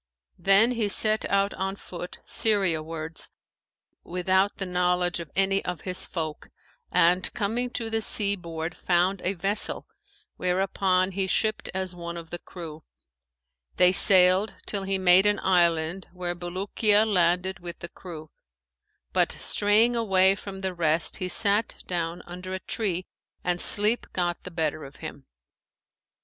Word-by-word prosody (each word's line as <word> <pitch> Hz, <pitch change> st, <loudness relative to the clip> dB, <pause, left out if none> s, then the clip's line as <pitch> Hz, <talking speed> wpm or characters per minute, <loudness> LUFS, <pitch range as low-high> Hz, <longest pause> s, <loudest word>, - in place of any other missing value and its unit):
Then 200 Hz, +5 st, +4 dB
he 230 Hz, -4 st, -1 dB
set 215 Hz, +2 st, +2 dB
out 200 Hz, 0 st, +1 dB
on 195 Hz, +1 st, -3 dB
foot 180 Hz, -2 st, -9 dB
Syria 195 Hz, -7 st, +3 dB
wards 160 Hz, 0 st, -5 dB, 0.7 s
without 190 Hz, +3 st, 0 dB
the 195 Hz, -, -4 dB
knowledge 180 Hz, -1 st, 0 dB
of 165 Hz, -3 st, -8 dB
any 195 Hz, +1 st, +2 dB
of 180 Hz, -3 st, -5 dB
his 185 Hz, -1 st, -3 dB
folk, 160 Hz, -3 st, -5 dB, 0.4 s
and 180 Hz, +2 st, +3 dB
coming 235 Hz, +3 st, -2 dB
to 240 Hz, -2 st, -4 dB
the 225 Hz, 0 st, 0 dB
sea 205 Hz, -2 st, +2 dB
board 165 Hz, -2 st, -6 dB
found 180 Hz, +2 st, 0 dB
a 190 Hz, +2 st, -1 dB
vessel 195 Hz, +4 st, -1 dB, 0.5 s
whereon 185 Hz, 0 st, +1 dB
he 190 Hz, 0 st, -2 dB
shipped 215 Hz, +3 st, -1 dB
as 190 Hz, -1 st, -3 dB
one 170 Hz, -1 st, -7 dB
of 165 Hz, -1 st, -10 dB
the 175 Hz, -, -4 dB
crew. 160 Hz, -4 st, -10 dB, 0.9 s
They 180 Hz, 0 st, +6 dB
sailed 185 Hz, +2 st, +6 dB
till 200 Hz, -, -3 dB
he 195 Hz, 0 st, 0 dB
made 185 Hz, +1 st, +5 dB
an 205 Hz, -1 st, +1 dB
island, 170 Hz, -1 st, +1 dB
where 180 Hz, -1 st, -3 dB
Bulukiya 200 Hz, +4 st, +1 dB
landed 185 Hz, -1 st, +1 dB
with 175 Hz, -1 st, -7 dB
the 170 Hz, -, -8 dB
crew, 160 Hz, -4 st, -11 dB, 0.8 s
but -, -, +2 dB
straying 215 Hz, +4 st, +2 dB
away 195 Hz, -4 st, +3 dB
from 195 Hz, -1 st, -8 dB
the 190 Hz, -1 st, -2 dB
rest 165 Hz, -2 st, 0 dB
he 185 Hz, -, -3 dB
sat 205 Hz, +3 st, +2 dB
down 170 Hz, -1 st, -4 dB
under 180 Hz, +2 st, -7 dB
a -, -, -5 dB
tree 185 Hz, -4 st, -3 dB, 0.4 s
and 175 Hz, -1 st, -1 dB
sleep 210 Hz, +3 st, +4 dB
got 175 Hz, -1 st, -1 dB
the -, -, -6 dB
better 160 Hz, -3 st, -2 dB
of 135 Hz, 0 st, -11 dB
him. 140 Hz, -1 st, -10 dB
185 Hz, 150 wpm, -26 LUFS, 175-200 Hz, 0.9 s, They